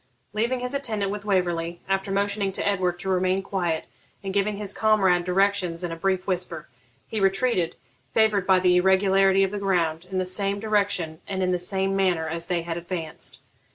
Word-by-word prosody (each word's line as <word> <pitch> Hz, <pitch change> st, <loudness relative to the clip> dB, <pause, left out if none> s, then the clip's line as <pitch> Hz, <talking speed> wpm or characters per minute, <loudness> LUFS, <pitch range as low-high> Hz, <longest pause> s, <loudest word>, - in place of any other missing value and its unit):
Leaving 235 Hz, +4 st, 0 dB
his 250 Hz, +2 st, -2 dB
attendant 220 Hz, -8 st, -2 dB
with 205 Hz, 0 st, -5 dB
Waverley, 175 Hz, -3 st, 0 dB
after 195 Hz, 0 st, 0 dB
motioning 200 Hz, 0 st, 0 dB
to -, -, -2 dB
Edward 180 Hz, -3 st, 0 dB
to 190 Hz, -, -7 dB
remain 185 Hz, +1 st, +1 dB
quiet, 175 Hz, -5 st, -1 dB, 0.4 s
and 195 Hz, -1 st, -4 dB
giving 200 Hz, +1 st, +1 dB
his 205 Hz, -1 st, -5 dB
comrade 195 Hz, -5 st, +3 dB
directions 185 Hz, -2 st, +1 dB
in 175 Hz, -, -2 dB
a -, -, -3 dB
brief 185 Hz, +2 st, 0 dB
whisper, 175 Hz, -4 st, -2 dB, 0.4 s
he 220 Hz, -, -3 dB
retreated, 195 Hz, -2 st, +1 dB, 0.4 s
favoured 215 Hz, -4 st, +2 dB
by 190 Hz, -1 st, +5 dB
the 180 Hz, -1 st, +4 dB
irregularity 190 Hz, +1 st, +4 dB
of 190 Hz, -, 0 dB
the 205 Hz, -, -3 dB
ground, 175 Hz, -4 st, 0 dB
in 190 Hz, -, -3 dB
the 185 Hz, -, +1 dB
same 195 Hz, +2 st, -1 dB
direction 200 Hz, -6 st, 0 dB
and 190 Hz, -2 st, -2 dB
in 185 Hz, -, +1 dB
the 180 Hz, -, +1 dB
same 190 Hz, +2 st, -1 dB
manner 180 Hz, -4 st, +1 dB
as 165 Hz, +1 st, -3 dB
they 175 Hz, -2 st, 0 dB
had 165 Hz, 0 st, -4 dB
advanced. 170 Hz, -2 st, -5 dB
190 Hz, 190 wpm, -25 LUFS, 180-200 Hz, 0.4 s, by